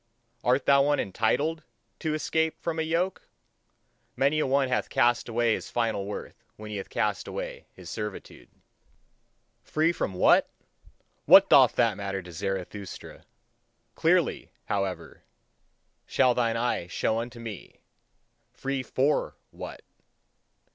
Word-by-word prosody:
Art 130 +2 +2
thou 140 0 +6
one 145 0 +2
ENTITLED 145 - 0 0.4
to 155 -1 -1
escape 160 +1 -1
from 165 -1 -3
a - - +2
yoke? 170 +4 -1 0.9
Many 140 +3 +2
a 150 - +1
one 135 0 +2
hath 125 - -1
cast 120 0 +2
away 115 0 +2
his - - -5
final 115 -4 -1
worth 105 - -7
when 110 0 -9
he 105 - -4
hath 95 - -6
cast 105 -4 -1
away - - -6
his 90 -2 -12
servitude. 105 +3 -7 1.1
Free 160 +2 +1
from 95 - -3
what? 90 - +4 0.8
What - - +8
doth - - +7
that - - +2
matter 95 -1 -4
to 90 - -11
Zarathustra! 95 +2 -6 0.7
Clearly, - - +1 0.2
however, 100 -2 -3 0.9
shall 130 -2 +3
thine 115 -2 0
eye 120 -7 -1
show 110 +4 0
unto 120 0 -6
me: 110 -5 -9 0.7
free 135 0 -3
FOR 135 +3 0 0.2
WHAT? - - -9
120 Hz, 130 wpm, -27 LUFS, 100-140 Hz, 1.1 s, What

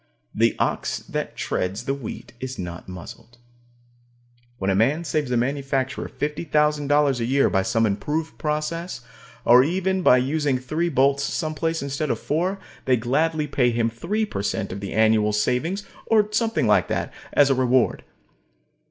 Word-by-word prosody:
The - - +2
ox - - -1
that - - -4
treads 100 +6 -2
the 135 - 0
wheat 135 -5 -7
is 130 0 -5
not 90 0 -7
muzzled. 90 +6 -10 1.2
When 95 -2 0
a - - +1
man 135 - +2
saves 150 -3 -1
a 125 - +1
manufacturer 135 +1 -1
$50,000 150 -2 +1
a 115 - 0
year 135 +3 +2
by 95 - +2
some 115 +3 +1
improved 150 +10 -2
process, 155 +4 -3 0.4
or 125 +2 +7
even 190 +4 0
by 125 - +6
using 140 +1 +1
three 155 +7 -1
bolts 140 -1 +2
someplace 160 0 -2
instead 140 +2 -2
of - - 0
four, 180 +6 -1 0.3
they 130 -1 +3
gladly 150 +6 0
pay 135 -4 +2
him 115 -1 0
three 200 - -1
per 155 - -4
cent 100 -1 -2
of 95 - -5
the 100 -1 -5
annual 110 -1 +3
savings, 145 - 0 0.2
or 215 -2 +4
something 225 +1 +1
like - - +3
that, - - -2 0.2
as 140 -1 +5
a - - +5
reward. 130 -1 +2
140 Hz, 160 wpm, -23 LUFS, 120-155 Hz, 1.2 s, or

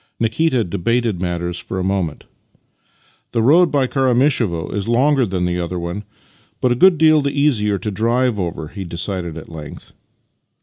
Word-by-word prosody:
Nikita 120 +3 +1
debated 105 +2 -1
matters 85 -1 -3
for 95 - -6
a 95 - -1
moment. 95 -5 -2 0.6
" - - -37
The 115 -2 +1
road 165 +7 +5
by 140 -2 +1
Karamishevo 125 - +1
is 100 -1 -3
longer 130 +2 +3
than 90 -2 -1
the 90 0 -1
other 90 +1 -3
one, 85 +4 -5 0.5
but 125 - +1
a - - +3
good 185 +6 +5
deal 155 0 +5
the 140 0 -2
easier 105 -9 +2
to 105 - -4
drive 115 +2 0
over," 85 -4 -4
he 100 +2 -7
decided 85 -1 -4
at 80 - -9
length. 75 -2 -10
105 Hz, 170 wpm, -19 LUFS, 90-130 Hz, 0.6 s, road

